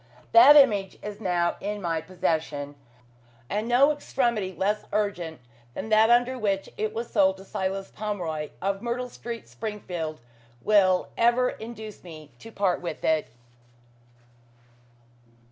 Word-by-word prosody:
That 345 -4 +9
image 210 -9 +4
is 210 +1 -7
now 175 -3 0
in 205 +1 -4
my 165 -4 -1
possession, 160 -5 -2 0.8
and 210 +3 -1
no 260 +5 +5
extremity 240 -9 -1
less 195 +4 -1
urgent 175 -8 -2 0.3
than 220 - -5
that 220 +1 +5
under 245 +2 +3
which 195 -3 -1
it 215 0 -2
was 230 +2 -5
sold 190 -3 +3
to 190 - -13
Silas 195 0 -3
Pomeroy, 175 -8 -4
of 195 0 -1
Myrtle 245 +1 -3
Street, 235 -1 -7
Springfield, 180 -8 -5 0.4
will 190 -3 +3
ever 240 +2 +3
induce 220 -2 -9
me 155 -4 -11
to 225 - -11
part 195 -4 0
with 170 -3 -6
it. 160 -1 +1
200 Hz, 130 wpm, -26 LUFS, 180-230 Hz, 0.8 s, That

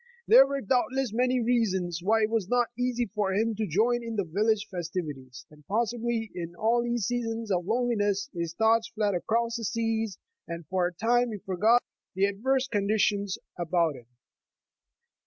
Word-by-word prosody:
There 270 - +8
were 275 0 -2
doubtless 255 +1 0
many 250 +2 +2
reasons 190 -8 0
why 220 +4 +2
it 215 - 0
was 220 -5 0
not 245 -1 +2
easy 245 0 0
for 205 -2 -2
him 225 +2 +1
to 215 0 -2
join 235 +8 +1
in 230 -1 -5
the 200 - 0
village 210 +5 0
festivities, 155 -8 -5
and 150 0 -18
pos 225 +2 +1
sibly 235 -2 -3
in 170 -1 -6 0.3
these 240 -2 -1
seasons 230 -2 -2
of 180 -1 0
loneliness, 210 -4 0
his 170 -2 -4
thoughts 225 +2 +3
fled 210 -2 -1
across 230 +6 0
the 230 - -6
seas, 225 -2 -1 0.3
and 170 -1 -6
for 180 +2 0
a - - -5
time 235 +6 +1
he 210 - -4
forgot 210 +6 +2 0.3
the 190 +1 +3
adverse 255 +7 0
conditions 205 -2 0 0.2
about 170 -2 +1
him. 120 -2 -14
215 Hz, 170 wpm, -28 LUFS, 185-235 Hz, 0.3 s, There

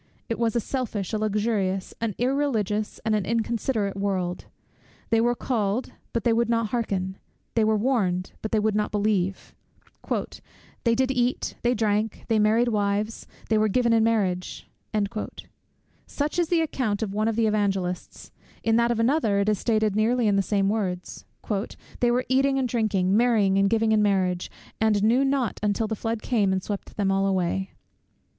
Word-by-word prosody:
It 230 - -2
was 230 -1 +1
a - - +3
selfish, 225 -6 -3
a 215 - 0
luxurious, 205 -3 -1
an 225 -4 -1
irreligious, 230 -6 0
and 220 - +2
an 210 -2 +1
inconsiderate 225 -1 -1
world. 190 -3 -2 0.7
They 225 0 +4
were 240 +1 +2
called, 225 -1 -1 0.2
but 235 - -2
they 235 - +3
would 235 0 +1
not 230 -2 +1
hearken; 195 -5 -2 0.4
they 225 - +2
were 215 0 +3
warned, 205 -7 0
but 220 - -4
they 220 - +2
would 215 0 +1
not 210 0 0
believe 200 -3 -1 1.3
"They 230 -1 +3
did 260 +2 +1
eat, 250 0 0
they 245 +1 +2
drank, 215 0 -1
they 225 -1 +3
married 220 +3 +3
wives, 210 0 -1 0.2
they 220 -1 +2
were 215 - +3
given 235 +2 +2
in 225 -1 +4
marriage:" 195 -6 -1 1.4
such 295 +4 -2
is 340 -2 +1
the 340 -2 +3
account 235 -9 -1
of 200 -3 -4
one 215 +1 0
of 225 - 0
the 230 0 +2
Evangelists; 195 -4 -2 0.3
in 225 0 +3
that 235 0 +3
of 235 -1 0
another 230 -4 +2
it 200 - +1
is 210 -3 +1
stated 215 -3 +1
nearly 230 +2 +2
in 205 - +3
the 200 - +3
same 195 0 +1
words; 190 -4 -3 0.7
"They 240 - +3
were 250 +1 +1
eating 270 +1 +2
and 265 -1 +1
drinking, 205 -5 +1
marrying 215 -5 +3
and 195 0 +3
giving 225 0 +2
in 215 -1 +4
marriage, 185 -3 +1 0.3
and 215 -2 +2
knew 240 +5 +4
not 270 -5 0
until 210 +1 0
the 220 0 -2
flood 225 +1 -3
came 210 -6 +2
and 190 -1 -1
swept 205 0 -6
them 200 -2 +1
all 195 0 +2
away." 190 0 0
215 Hz, 180 wpm, -25 LUFS, 200-235 Hz, 1.4 s, They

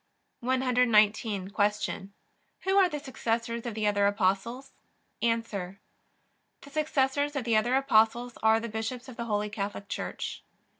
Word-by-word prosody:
119. 230 -6 +2
Q. 205 -1 -1 0.5
Who 380 +1 +1
are 375 -2 +5
the 295 - -4
successors 235 -3 -2
of 230 - -4
the 215 -1 -1
other 205 -1 +3
Apostles? 205 +6 0 0.5
A. 230 -1 +3
The 195 -4 -6 0.9
successors 285 -1 +1
of 275 - -1
the 230 -1 +1
other 240 +4 +3
Apostles 240 -2 +3
are 220 0 +5
the 230 - -4
bishops 225 +4 -4
of 255 - -9
the 235 - -4
Holy 210 -2 -1
Catholic 200 -1 -4
Church. - - -4
230 Hz, 140 wpm, -29 LUFS, 210-255 Hz, 0.9 s, are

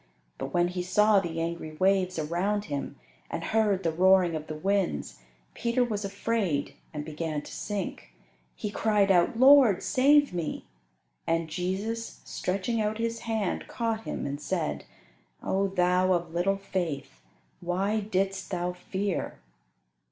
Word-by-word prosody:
But 135 0 -4
when 175 +2 +2
he 180 0 -3
saw 210 +3 +4
the 165 -3 -4
angry 165 -1 -3
waves 185 +1 +2
around 180 +7 -1
him 140 -4 -4 0.3
and 165 - -4
heard 210 -3 +1
the 165 - +1
roaring 185 +1 +4
of 155 0 -5
the 155 - -5
winds, 190 - -1 0.3
Peter 235 +2 +1
was 210 -4 -2
afraid 200 -6 -1 0.2
and 150 -1 -5
began 155 -1 -3
to - - -11
sink. 195 - -5 0.4
He 210 - -4
cried 210 -2 +2
out, 180 +4 +3
"Lord, 260 -7 +7
save 285 +1 +4
me." 170 -3 -3 0.6
And 165 0 +1
Jesus, 200 +7 -3
stretching 200 +5 -1
out 215 0 -1
His 230 0 -2
hand, 220 -5 -2
caught 225 -2 -2
him, - - -4
and 145 +1 -4
said, 165 0 -2 0.6
"O 195 +1 +1
thou 185 0 +2
of 170 -2 -2
little 190 +3 +1
faith, 160 - -4 0.4
why 190 +5 0
didst 195 -2 -1
thou 180 -1 -2
fear?" 190 +2 -3
190 Hz, 145 wpm, -28 LUFS, 170-210 Hz, 0.6 s, Lord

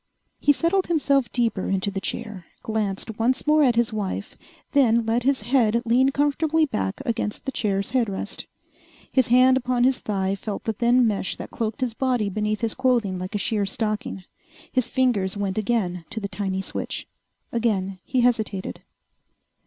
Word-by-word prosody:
He 290 - +4
settled 340 +6 +1
himself 280 -6 +2
deeper 230 -6 0
into 195 +1 0
the 195 -1 -4
chair, 190 -2 -5 0.2
glanced 215 0 -2
once 245 +3 +1
more 305 +1 +4
at 250 -5 +4
his 235 -1 +1
wife, 205 -1 -4 0.4
then 235 -5 +4
let 225 +2 +1
his 265 -2 +1
head 235 -2 +3
lean 250 +3 +4
comfortably 295 +3 +2
back 215 -3 -3
against 230 -2 -2
the 270 - -2
chair's 200 -5 -1
headrest. 230 -7 -2 0.6
His 260 -3 +3
hand 255 +2 +6
upon 250 -1 0
his 260 0 +3
thigh 195 -2 -1
felt 200 +1 -5
the 225 - -1
thin 240 +2 +3
mesh 200 -4 -1
that - - -8
cloaked 225 +1 -3
his 250 -3 0
body 245 -4 0
beneath 210 +2 -1
his 230 -2 0
clothing 240 -8 +1
like 185 +4 -5
a - - +3
sheer 210 0 0
stocking. 210 0 -3 0.5
His 255 -2 0
fingers 220 -8 +1
went 200 0 -1
again 195 -6 -1
to 220 - -3
the 200 - -3
tiny 190 -1 -2
switch. - - -4 0.4
Again 195 -5 0
he 255 -1 0
hesitated. 220 -5 0
225 Hz, 170 wpm, -24 LUFS, 200-255 Hz, 0.6 s, hand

